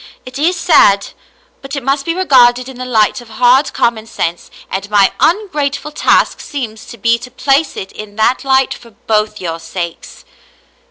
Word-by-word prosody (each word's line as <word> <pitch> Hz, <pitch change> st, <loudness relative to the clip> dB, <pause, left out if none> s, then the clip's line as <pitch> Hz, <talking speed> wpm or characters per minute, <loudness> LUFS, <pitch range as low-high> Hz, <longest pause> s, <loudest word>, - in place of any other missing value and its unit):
It 255 Hz, +2 st, -8 dB
is 340 Hz, +5 st, +2 dB
sad, 200 Hz, -, +4 dB, 0.5 s
but 275 Hz, +1 st, -7 dB
it 280 Hz, -, -4 dB
must 275 Hz, +2 st, -1 dB
be 335 Hz, -, 0 dB
regarded 255 Hz, -8 st, +4 dB
in 260 Hz, -2 st, -10 dB
the 255 Hz, -, -4 dB
light 225 Hz, 0 st, +1 dB
of 240 Hz, -, -15 dB
hard 250 Hz, +5 st, +3 dB
common 225 Hz, -2 st, -1 dB
sense, 170 Hz, -6 st, -4 dB, 0.2 s
and 195 Hz, +2 st, -5 dB
my 205 Hz, -2 st, +3 dB
ungrateful 300 Hz, -7 st, 0 dB
task -, -, +2 dB
seems 230 Hz, -7 st, -6 dB
to 235 Hz, -, -10 dB
be 230 Hz, +2 st, +1 dB
to 250 Hz, -, -10 dB
place 275 Hz, +4 st, 0 dB
it 190 Hz, -, -6 dB
in 210 Hz, -1 st, -10 dB
that 220 Hz, +4 st, +1 dB
light 265 Hz, -1 st, +2 dB
for 235 Hz, -, -14 dB, 0.2 s
both 215 Hz, -1 st, 0 dB
your 165 Hz, -2 st, -4 dB
sakes." 170 Hz, 0 st, -7 dB
245 Hz, 175 wpm, -15 LUFS, 215-275 Hz, 0.5 s, sad